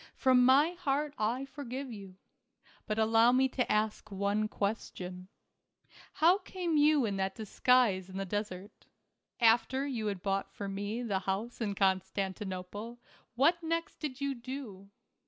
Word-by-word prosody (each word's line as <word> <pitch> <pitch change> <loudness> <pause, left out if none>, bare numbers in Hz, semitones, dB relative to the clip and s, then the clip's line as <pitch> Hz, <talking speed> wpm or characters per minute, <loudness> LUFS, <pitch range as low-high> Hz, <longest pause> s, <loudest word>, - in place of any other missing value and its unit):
From 255 -2 +4
my 275 +6 +5
heart 300 -4 -1
I 235 +5 0
forgive 270 -1 -6
you. 195 -3 -10 0.7
But 215 -1 -1
allow 225 +2 +5
me 260 +1 +4
to 250 -1 -1
ask 215 0 0
one 200 +2 0
question. 185 -4 -4 0.9
How 350 +5 +4
came 365 -4 -3
you 295 -3 +4
in 200 -2 -2
that 190 0 -1
dis 220 -3 -10
guise 230 -8 +4
in 190 - -7
the 195 - -2
desert? 205 0 -5 0.5
After 240 +3 +4
} - - -1
r - - -2
ou 235 -6 -3
had 195 -3 -3
bought 195 0 -1
for 200 - -6
me 205 +4 -3
the 200 -5 0
house 200 +6 -3
in 205 -3 -1
Constantinople, 195 +2 -2 0.4
what 325 +8 +3
next 330 0 -3
did 285 -4 -5
you 280 0 -1
do 235 -6 -8
225 Hz, 155 wpm, -31 LUFS, 195-270 Hz, 0.9 s, my